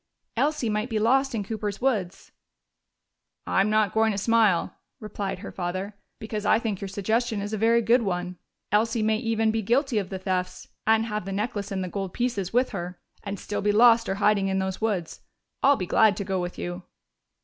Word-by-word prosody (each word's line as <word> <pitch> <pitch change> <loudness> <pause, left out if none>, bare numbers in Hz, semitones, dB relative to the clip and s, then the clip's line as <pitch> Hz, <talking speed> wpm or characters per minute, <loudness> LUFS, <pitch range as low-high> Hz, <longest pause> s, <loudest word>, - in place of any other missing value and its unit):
Elsie 285 +1 0
might 215 +3 -1
be 220 - -1
lost 265 +4 +2
in 210 - -1
Cooper's 210 -1 -4
woods!" 205 -8 -2 1.1
"I'm 195 +2 +2
not 215 -2 +2
going 220 0 +3
to - - -4
smile," 215 -4 +2 0.3
replied 205 -4 -4
her - - -6
father. 185 +2 -4 0.2
"Because 215 -1 -5
I 215 - +4
think 220 -4 -3
your 200 - -3
suggestion 220 +3 -1
is 205 +2 -4
a - - 0
very 230 +2 +3
good 235 +3 +4
one. 180 -3 -3 0.3
Elsie 225 +2 +2
may 220 0 +2
even 225 -1 +1
be 220 0 -1
guilty 240 +2 +1
of 190 -2 -5
the 190 - -4
thefts 185 -1 -3 0.2
and 225 0 +4
have 210 -4 -3
the 195 - -5
necklace 205 0 -3
and 190 -1 -2
the - - -3
gold 195 0 -5
pieces 230 -7 -1
with 250 +2 +2
her 180 -2 -6 0.2
and 200 -1 -5
still 205 - -4
be 205 - +2
lost 230 +1 +5
or 195 - 0
hiding 205 -1 +2
in 190 0 0
those 190 +1 -2
woods. 200 -7 -2 0.4
I'll 280 +1 +5
be 185 - -3
glad 215 +2 +4
to 200 - -2
go 190 -2 -1
with 175 0 -5
you." 175 +1 -5
210 Hz, 205 wpm, -26 LUFS, 195-225 Hz, 1.1 s, lost